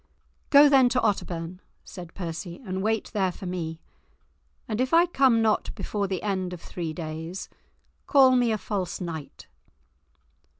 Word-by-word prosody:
"Go 285 Hz, +1 st, +8 dB
then 265 Hz, -3 st, +5 dB
to 250 Hz, -, +1 dB
Otterbourne," 180 Hz, -4 st, -2 dB, 0.2 s
said 175 Hz, -2 st, -10 dB
Percy, 170 Hz, -1 st, -6 dB
"and 190 Hz, -1 st, -3 dB
wait 220 Hz, +1 st, -1 dB
there 190 Hz, -3 st, +1 dB
for 185 Hz, -, -10 dB
me, 165 Hz, -3 st, -4 dB, 0.9 s
and 220 Hz, 0 st, -1 dB
if 260 Hz, +5 st, +2 dB
I 340 Hz, +1 st, +6 dB
come 265 Hz, -9 st, +3 dB
not 220 Hz, -1 st, +1 dB
before 200 Hz, -2 st, -2 dB
the 190 Hz, -2 st, -3 dB
end 190 Hz, -3 st, -2 dB
of 180 Hz, -, -7 dB
three 170 Hz, -3 st, -5 dB
days, 160 Hz, +2 st, -6 dB, 0.6 s
call 265 Hz, -2 st, +6 dB
me 245 Hz, -2 st, +3 dB
a 215 Hz, -, +1 dB
false 195 Hz, -2 st, -3 dB
knight." 165 Hz, -5 st, -7 dB
190 Hz, 155 wpm, -26 LUFS, 175-230 Hz, 0.9 s, Go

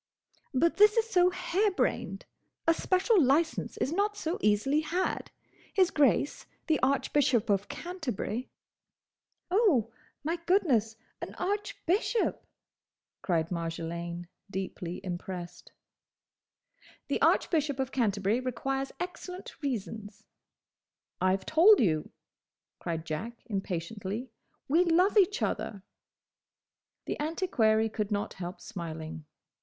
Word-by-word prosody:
"But 315 Hz, +5 st, +2 dB
this 420 Hz, +2 st, +6 dB
is 455 Hz, 0 st, +3 dB
so 360 Hz, -4 st, +4 dB
harebrained! 370 Hz, +2 st, 0 dB, 0.4 s
A 330 Hz, -, +5 dB
special 375 Hz, +4 st, +3 dB
licence 300 Hz, +5 st, +1 dB
is 270 Hz, -, 0 dB
not 410 Hz, +3 st, 0 dB
so 330 Hz, -1 st, -2 dB
easily 215 Hz, +8 st, +3 dB
had. 345 Hz, +4 st, -1 dB, 0.5 s
His 370 Hz, -3 st, +4 dB
Grace, 280 Hz, -, +2 dB, 0.2 s
the 315 Hz, -2 st, +2 dB
Archbishop 260 Hz, -4 st, +2 dB
of 200 Hz, 0 st, 0 dB
Canterbury—" 285 Hz, -, -4 dB, 1.0 s
"Oh, 355 Hz, -, +3 dB, 0.3 s
my 325 Hz, +4 st, -1 dB
goodness! 255 Hz, -, +3 dB, 0.3 s
an -, -, -6 dB
_Arch_bishop!"—cried 370 Hz, -, -2 dB
Marjolaine, 170 Hz, 0 st, -4 dB, 0.2 s
deeply 185 Hz, -2 st, -5 dB
impressed. 175 Hz, -1 st, -6 dB, 1.4 s
"The -, -, 0 dB
Archbishop 295 Hz, -5 st, +2 dB
of 265 Hz, 0 st, -1 dB
Canterbury 210 Hz, -2 st, +1 dB
requires 270 Hz, +2 st, -2 dB
excellent 360 Hz, +1 st, -6 dB
reasons." 220 Hz, -6 st, -4 dB, 1.0 s
"I 185 Hz, 0 st, +4 dB
've 190 Hz, -, -17 dB
told 370 Hz, +7 st, +7 dB
you," 155 Hz, -8 st, +1 dB, 0.7 s
cried 165 Hz, -1 st, -3 dB
Jack 225 Hz, +10 st, -5 dB
impatiently, 200 Hz, +3 st, -4 dB, 0.4 s
"we 325 Hz, +6 st, +4 dB
love 360 Hz, +4 st, +3 dB
each 410 Hz, 0 st, +4 dB
other!" 200 Hz, -3 st, -2 dB, 1.2 s
The -, -, -3 dB
antiquary 245 Hz, -, +2 dB
could 210 Hz, -2 st, -3 dB
not 205 Hz, -1 st, -2 dB
help 180 Hz, +1 st, -6 dB
smiling. 160 Hz, -3 st, -6 dB
255 Hz, 105 wpm, -30 LUFS, -, 1.4 s, told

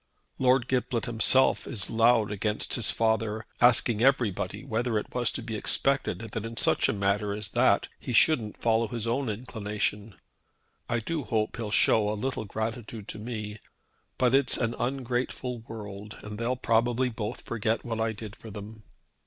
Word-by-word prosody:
Lord 130 Hz, -1 st, +3 dB
Giblet 125 Hz, -3 st, 0 dB
himself 120 Hz, +3 st, +3 dB
is 110 Hz, -8 st, -1 dB
loud 115 Hz, -1 st, +4 dB
against 105 Hz, +1 st, -1 dB
his 115 Hz, -, +2 dB
father, 110 Hz, -1 st, 0 dB
asking 120 Hz, -2 st, +4 dB
everybody 125 Hz, -7 st, +1 dB
whether 115 Hz, 0 st, 0 dB
it 105 Hz, -, -4 dB
was 120 Hz, -2 st, +1 dB
to 120 Hz, -, -4 dB
be 115 Hz, -1 st, -5 dB
expected 115 Hz, -2 st, 0 dB
that 115 Hz, -, -4 dB
in 115 Hz, 0 st, -7 dB
such -, -, +3 dB
a -, -, +4 dB
matter 100 Hz, 0 st, 0 dB
as 105 Hz, -1 st, -5 dB
that -, -, +3 dB
he -, -, -5 dB
shouldn't 115 Hz, -3 st, +3 dB
follow 115 Hz, 0 st, +2 dB
his 115 Hz, 0 st, -3 dB
own 120 Hz, +2 st, 0 dB
inclination. 105 Hz, -2 st, -3 dB, 0.7 s
I 120 Hz, -1 st, 0 dB
do 155 Hz, +6 st, -3 dB
hope 110 Hz, -3 st, -1 dB
he'll 115 Hz, -2 st, -3 dB
show 105 Hz, 0 st, +4 dB
a 105 Hz, -, -1 dB
little 130 Hz, 0 st, -2 dB
gratitude 110 Hz, 0 st, -5 dB
to -, -, -5 dB
me. 105 Hz, -2 st, -5 dB, 0.6 s
But 125 Hz, -1 st, +3 dB
it's 135 Hz, -1 st, +4 dB
an 115 Hz, -1 st, 0 dB
ungrateful 125 Hz, -1 st, -2 dB
world, 105 Hz, -1 st, -8 dB
and 105 Hz, 0 st, -7 dB
they'll 120 Hz, +2 st, 0 dB
probably 120 Hz, +1 st, +1 dB
both 110 Hz, -3 st, -5 dB
forget 115 Hz, 0 st, -1 dB
what 115 Hz, -2 st, -3 dB
I 110 Hz, 0 st, +1 dB
did 110 Hz, -1 st, -8 dB
for 115 Hz, -, -11 dB
them. 105 Hz, +1 st, -9 dB
115 Hz, 170 wpm, -28 LUFS, 105-120 Hz, 0.7 s, loud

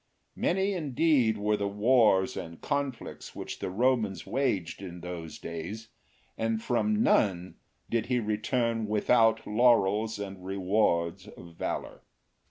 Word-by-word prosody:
Many 195 Hz, +3 st, +1 dB
indeed 145 Hz, -, +2 dB
were 105 Hz, +1 st, +1 dB
the 100 Hz, -1 st, -1 dB
wars 105 Hz, -2 st, +3 dB
and 85 Hz, 0 st, -7 dB
conflicts 140 Hz, -4 st, -4 dB
which -, -, -6 dB
the -, -, -3 dB
Romans 110 Hz, -1 st, 0 dB
waged 100 Hz, -12 st, -1 dB
in 90 Hz, -2 st, -8 dB
those 85 Hz, -2 st, -7 dB
days, 90 Hz, +8 st, -7 dB, 0.5 s
and 115 Hz, 0 st, 0 dB
from 210 Hz, -, +1 dB
none 95 Hz, -, +1 dB, 0.3 s
did 115 Hz, -1 st, -1 dB
he 125 Hz, -1 st, +1 dB
return 115 Hz, +1 st, -1 dB
without 115 Hz, +1 st, +3 dB
laurels 110 Hz, -2 st, +3 dB
and 95 Hz, -2 st, -7 dB
rewards 95 Hz, -1 st, 0 dB
of 85 Hz, -4 st, -12 dB
valour. -, -, -4 dB
110 Hz, 125 wpm, -29 LUFS, 95-120 Hz, 0.5 s, wars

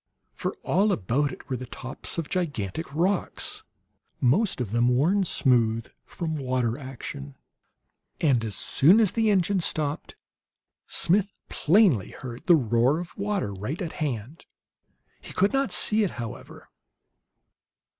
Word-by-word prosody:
For -, -, -4 dB
all 200 Hz, +4 st, +2 dB
about 140 Hz, -, 0 dB
it -, -, -11 dB
were 130 Hz, -, -2 dB
the 125 Hz, +1 st, -8 dB
tops 130 Hz, +6 st, -6 dB
of 165 Hz, -3 st, -2 dB
gigantic 155 Hz, -, -3 dB
rocks, 180 Hz, +4 st, 0 dB, 0.6 s
most 185 Hz, -, +2 dB
of 115 Hz, -6 st, -3 dB
them 120 Hz, +1 st, +2 dB
worn 155 Hz, +11 st, +3 dB
smooth 115 Hz, -7 st, +1 dB, 0.2 s
from 160 Hz, -3 st, -4 dB
water 125 Hz, -4 st, -1 dB
action. 115 Hz, -, -8 dB, 0.8 s
And, 130 Hz, -8 st, +2 dB
as 110 Hz, -4 st, -3 dB
soon 175 Hz, -, +4 dB
as 215 Hz, -5 st, +4 dB
the 225 Hz, -2 st, +1 dB
engine 195 Hz, -1 st, +2 dB
stopped, 155 Hz, -3 st, -2 dB, 0.7 s
Smith 195 Hz, +3 st, +2 dB, 0.2 s
plainly 165 Hz, -, +3 dB
heard 125 Hz, -2 st, -9 dB
the 175 Hz, -, +8 dB
roar 120 Hz, +1 st, +2 dB
of 175 Hz, 0 st, -8 dB
water 200 Hz, -, -2 dB
right 105 Hz, -, -5 dB
at 175 Hz, -5 st, -4 dB
hand. 135 Hz, +1 st, -4 dB, 0.7 s
He -, -, -10 dB
could 195 Hz, +5 st, +2 dB
not 270 Hz, -6 st, +1 dB
see 215 Hz, +4 st, +4 dB
it, 200 Hz, -, +1 dB
however. 115 Hz, -3 st, -8 dB
145 Hz, 135 wpm, -26 LUFS, 120-185 Hz, 0.8 s, the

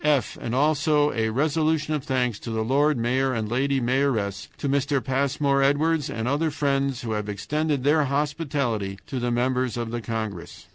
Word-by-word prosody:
"f. 145 Hz, -6 st, +2 dB
And 115 Hz, -, -2 dB
also 150 Hz, +1 st, +2 dB
a 110 Hz, -1 st, 0 dB
resolution 155 Hz, +4 st, +1 dB
of 150 Hz, -3 st, -2 dB
thanks 125 Hz, -5 st, 0 dB
to -, -, -7 dB
the 110 Hz, -1 st, -1 dB
Lord 140 Hz, +5 st, +2 dB
Mayor 130 Hz, +2 st, +1 dB
and 110 Hz, -2 st, -2 dB
Lady 135 Hz, +4 st, +1 dB
Mayoress, 120 Hz, -6 st, 0 dB
to -, -, -3 dB
Mr. 140 Hz, 0 st, +1 dB
Passmore 140 Hz, +1 st, +1 dB
Edwards, 150 Hz, +2 st, +2 dB
and 110 Hz, +1 st, -3 dB
other 150 Hz, +4 st, +1 dB
friends 140 Hz, -3 st, 0 dB
who 115 Hz, -, -3 dB
have 105 Hz, -1 st, -2 dB
extended 145 Hz, +7 st, -1 dB
their 150 Hz, +1 st, +3 dB
hospitality 140 Hz, -8 st, -1 dB
to 135 Hz, -, -4 dB
the 120 Hz, 0 st, -1 dB
members 125 Hz, 0 st, 0 dB
of 115 Hz, -1 st, -3 dB
the 120 Hz, 0 st, -3 dB
congress. 110 Hz, -6 st, -5 dB
135 Hz, 180 wpm, -25 LUFS, 120-145 Hz, -, their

